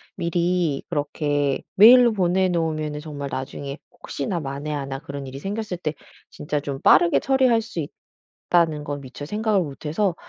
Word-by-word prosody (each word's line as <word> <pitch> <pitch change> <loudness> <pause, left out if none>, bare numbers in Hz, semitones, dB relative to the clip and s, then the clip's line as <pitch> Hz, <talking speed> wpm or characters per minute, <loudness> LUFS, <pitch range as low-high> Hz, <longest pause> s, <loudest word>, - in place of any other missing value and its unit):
미리 170 -3 0
그렇게 145 -3 -1
메일로 240 +3 +8
보내 185 -1 +2
놓으면은 155 -3 -2
정말 145 -2 -6
나중에 140 +2 -5
혹시나 170 +5 -4
만에 145 +1 -5
하나 135 -2 -4
그런 140 -2 -7
일이 135 +1 -8
생겼을 205 +3 -4
때 155 -3 -3 0.4
진짜 150 0 -3
좀 140 -2 -5
빠르게 170 +5 +5
처리할 260 -4 +3
수 215 -7 -5 0.7
있다는 160 -4 +2
건 145 0 -4
미처 130 +2 -9
생각을 210 +3 0
못 145 -1 -7
해서 175 +4 0
155 Hz, 325 characters per minute, -23 LUFS, 145-180 Hz, 0.7 s, 메일로